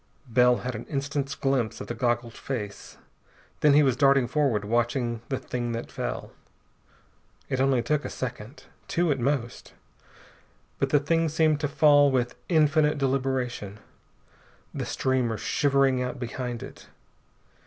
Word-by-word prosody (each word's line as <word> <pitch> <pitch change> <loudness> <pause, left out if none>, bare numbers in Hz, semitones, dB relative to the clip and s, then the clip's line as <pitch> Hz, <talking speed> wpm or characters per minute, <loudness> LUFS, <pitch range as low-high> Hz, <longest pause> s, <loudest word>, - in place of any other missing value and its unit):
Bell 125 +1 +4
had 125 - -2
an 110 +1 -7
instant's 140 0 -3
glimpse 130 -5 -1
of - - -6
the - - -5
goggled 120 -2 -1
face. 110 -7 -6 0.6
Then 150 -1 +5
he 150 - +6
was 130 -4 +2
darting 135 -1 +4
forward, 130 -8 0
watching 120 +1 0
the 135 - -1
thing 120 -2 -4
that 115 - -5
fell. - - -4 1.2
It 130 - -1
took 130 - +2
only 130 -3 +2
a 150 +3 0
second. 125 +1 -6 0.2
Two 170 -2 +1
at 135 - 0
most. 125 -2 -2 1.1
But 135 - +1
the 145 - +4
thing 165 +3 +1
seemed 155 -1 +2
to 145 - 0
fall 145 -1 +5
with 125 -2 0 0.2
infinite 155 -2 +3
deliberation, 130 -6 -1 1.0
the - - -4
streamer 125 -4 0
shivering 135 -1 +2
out 125 +2 -3
behind 120 -1 -4
it. - - -12
130 Hz, 145 wpm, -26 LUFS, 120-145 Hz, 1.2 s, he